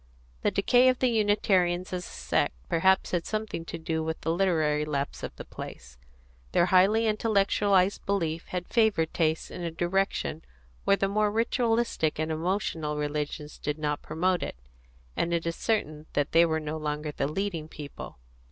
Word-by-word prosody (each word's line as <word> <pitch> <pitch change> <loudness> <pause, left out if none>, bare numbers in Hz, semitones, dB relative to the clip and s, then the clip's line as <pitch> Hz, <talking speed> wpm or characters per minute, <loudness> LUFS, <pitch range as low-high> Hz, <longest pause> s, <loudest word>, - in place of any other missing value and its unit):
The - - +3
decay 245 +6 +4
of 255 - +2
the 255 - +2
Unitarians 195 -5 +2
as 180 -1 -3
a - - -11
sect - - 0
perhaps 190 +3 +3
had 175 -2 -1
something 215 -5 -3
to 165 - -5
do 160 -1 -2
with 160 0 -3
the 165 - 0
literary 160 -5 +2
lapse 140 -2 -3
of - - -6
the - - -9
place: 65 0 -9 0.5
their 175 - +4
highly 195 +5 +4
intellectualised 200 -3 +2
belief 170 -5 -1
had 180 -1 -4
favoured 215 -9 +2
taste 160 -2 0
in - - -7
a 170 - -2
direction 175 -1 -1 0.4
where - - +5
the 195 - +1
more 210 +1 +2
ritualistic 230 -6 +1
and 155 +1 -1
emotional 160 -2 -1
religions 150 0 -3
did 150 0 -2
not 150 -1 -2
promote 180 +2 0
it: - - -4 0.6
and 170 0 0
it 170 - -2
is 165 0 -1
certain 155 -9 -1
that 145 -1 0
they 170 +1 +6
were 160 -1 0
no 155 0 -4
longer 150 0 -3
the 140 -1 -1
leading 165 -1 -3
people. 145 - -9
170 Hz, 170 wpm, -28 LUFS, 155-200 Hz, 0.6 s, they